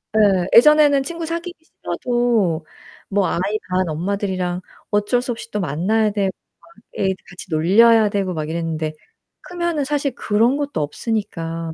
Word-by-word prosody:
예. 195 -4 +3
예전에는 290 +1 +6
친구 335 +3 -5
사귀기 340 +2 -5
싫어도 235 - -1 0.4
뭐 200 -1 +1
아이 - - -1 0.3
반 185 0 +1
엄마들이랑 185 +1 -2 0.3
어쩔 210 +4 +1
수 250 - -3
없이 230 0 -7
또 210 - -2
만나야 190 +7 +1
되고 200 -2 0 0.3
막 - - -21 0.3
애들 190 -1 +1
같이 190 0 -10
놀려야 210 +7 +5
되고 195 -3 -1
막 155 -1 -4
이랬는데 160 -2 -3 0.5
크면은 345 -4 -2
사실 285 -2 -1
그런 230 +6 +2
것도 285 - -2
없으니까. 165 -2 -3
205 Hz, 310 characters per minute, -20 LUFS, 175-245 Hz, 0.5 s, 예전에는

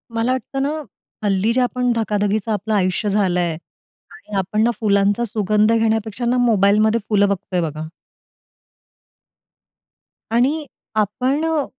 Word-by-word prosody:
मला 230 +2 +1
वाटतं 260 +2 -3
ना 280 - 0 0.5
हल्ली 200 +2 +1
जे 255 - +2
आपण 250 0 0
धकाधकीचं 210 -1 0
आपलं 215 +1 -2
आयुष्य 190 +2 0
झालंय 180 -4 +1 0.6
आणि 210 - -10
आपण 195 +3 0
ना 235 - +3
फुलांचा 200 +1 +2
सुगंध 215 0 +1
घेण्यापेक्षा 225 0 0
ना 245 +1 +2
मोबाईलमध्ये 215 -1 +3
फुलं 205 -2 +3
बघतोय 190 -2 -2
बघा. 155 -1 -4 2.4
आणि 275 +7 +1 0.3
आपण 250 +8 0
अ, 320 -3 0
215 Hz, 120 wpm, -20 LUFS, 200-240 Hz, 2.4 s, ना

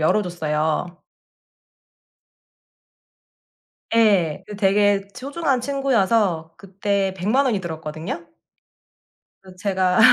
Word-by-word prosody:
열어 160 +7 +3
줬어요. 160 0 -2 2.9
예. 200 -9 +3
그 210 - -8
되게 205 0 +3
소중한 275 +1 -1
친구여서 225 - +1
그때 195 0 -1
100 190 +2 -3
만 275 +2 +4
원이 220 -6 +1
들었거든요. 160 0 -6 1.2
그 185 -1 -14
제가 185 -1 +1
195 Hz, 170 characters per minute, -22 LUFS, 170-215 Hz, 2.9 s, 만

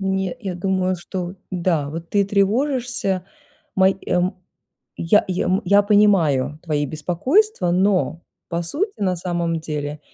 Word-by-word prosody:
Не 190 +3 -1
я 195 -5 -4
думаю, 185 +1 0
что 180 +1 -5 0.2
да, 170 -5 0
вот 165 +2 -7
ты 200 -1 +3
тревожишься 210 -1 0 0.5
мои 190 0 +4
мо 180 +1 +1 0.6
я 170 +5 +3
я 185 -1 -1 0.2
я 200 +3 +5
понимаю 165 - +3
твои 150 -3 -1
беспокойства, 180 - +1
но 185 -3 +1 0.3
по 170 0 -2
сути 350 - -3
на 185 -2 +1
самом 170 -1 -2
деле 150 -2 -4
185 Hz, 130 wpm, -21 LUFS, 170-200 Hz, 0.6 s, я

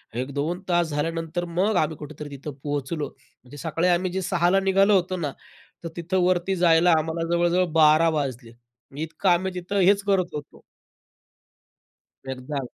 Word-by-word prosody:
एक 130 +3 -3
2 165 +6 -2
तास 175 -2 +2
झाल्यानंतर 165 +3 -2
मग 185 +5 0
आम्ही 155 -1 0
कुठेतरी 150 0 -8
तिथं 140 +1 -7
पोहोचलो. 145 +1 -3 0.4
म्हणजे 135 +3 -13
सकाळी 165 +3 -1
आम्ही 180 +1 +1
जे 190 +1 -2
6:00 175 -1 +1
ला 195 +1 +4
निघालो 195 +1 +3
होतो 185 0 0
ना, 150 -5 -2 0.5
तर 165 - -4
तिथं 180 +3 -1
वरती 185 +1 +1
जायला 170 0 +4
आम्हाला 165 +1 -2
जवळ-जवळ 175 +1 +2
12:00 160 +1 +5
वाजले. 130 -6 -3
म्हणजे 120 +5 -11
इतकं 165 +4 -1
आम्ही 185 +2 +2
तिथं 190 +3 -2
हेच 200 +2 +4
करत 185 -3 +1
होतो. 145 -1 -9 1.7
एकदा 130 +1 -4
165 Hz, 160 wpm, -24 LUFS, 150-180 Hz, 1.7 s, 12:00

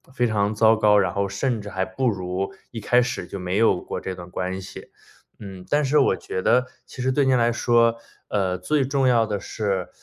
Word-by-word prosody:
非 125 - +2
常 105 -2 0
糟 110 +1 +5
糕， 105 -1 +4
然 100 - +1
后 100 0 -1
甚 110 +4 -2
至 105 - -8
还 95 -2 -2
不 130 +3 -1
如 95 -1 -3 0.2
一 115 - -6
开 120 +3 +3
始 120 -7 -4
就 100 - -7
没 90 0 -3
有 105 -4 +3
过 - - -6
这 95 -1 -5
段 90 0 -11
关 95 +1 -3
系。 95 - -10 0.5
嗯， 95 -3 -10
但 150 +1 +2
是 145 +2 +2
我 135 -9 +4
觉 95 - -5
得 125 +5 +3 0.2
其 130 - -9
实 130 +1 +1
对 140 +1 +2
您 130 -1 +3
来 120 0 +2
说， 115 -1 +2 0.3
呃， 95 -3 0
最 135 +10 0
重 135 0 +1
要 120 -3 +4
的 105 -1 -2
是 100 -2 -3
105 Hz, 240 characters per minute, -23 LUFS, 95-125 Hz, 0.5 s, 糟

